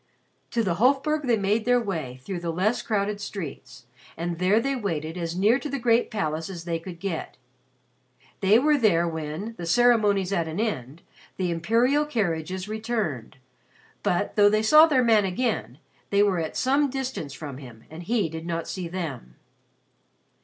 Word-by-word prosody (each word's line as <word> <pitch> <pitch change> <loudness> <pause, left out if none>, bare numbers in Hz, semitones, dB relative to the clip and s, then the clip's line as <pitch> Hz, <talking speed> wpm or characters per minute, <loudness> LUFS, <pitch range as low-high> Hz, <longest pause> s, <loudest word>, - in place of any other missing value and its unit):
To 230 - 0
the 175 -4 -1
Hofburg 280 +4 +2
they 235 -2 +3
made 205 +2 +1
their 245 0 +4
way 155 - -4
through 185 +4 -4
the 170 -1 -4
less 190 +8 0
crowded 205 -1 -1
streets, 155 - -7 0.3
and 170 0 -3
there 190 +4 +3
they 275 +4 -1
waited 165 - -3
as 170 -1 -4
near 215 +7 +4
to 295 - -5
the 275 - -2
great 235 -1 +2
palace 160 -6 -2
as 175 -3 -7
they 170 -1 -2
could 170 0 -9
get. 180 -3 -4 1.0
They 200 +3 +5
were 295 +3 +3
there 175 -7 +3
when, 160 +7 -5
the 170 - -5
ceremonies 210 -3 +3
at 170 -4 0
an 160 +4 -4
end, 155 - -3 0.3
the 180 -2 -1
imperial 235 - +2
carriages 185 - -2
returned, 215 - -3 0.6
but, 180 +3 -1
though 205 -1 +6
they 215 +1 +1
saw 305 +8 +7
their 265 -5 +3
man 225 -3 +4
again, 185 - -2 0.3
they 200 0 +4
were 195 -4 +1
at 160 -1 -4
some 280 +2 +2
distance 255 - -4
from 140 -3 -7
him 120 -5 -12
and 160 +2 -8
he 215 +1 0
did 160 +1 -7
not 165 -1 -3
see 185 -3 -4
them. 155 - -6
195 Hz, 175 wpm, -25 LUFS, 165-230 Hz, 1.0 s, saw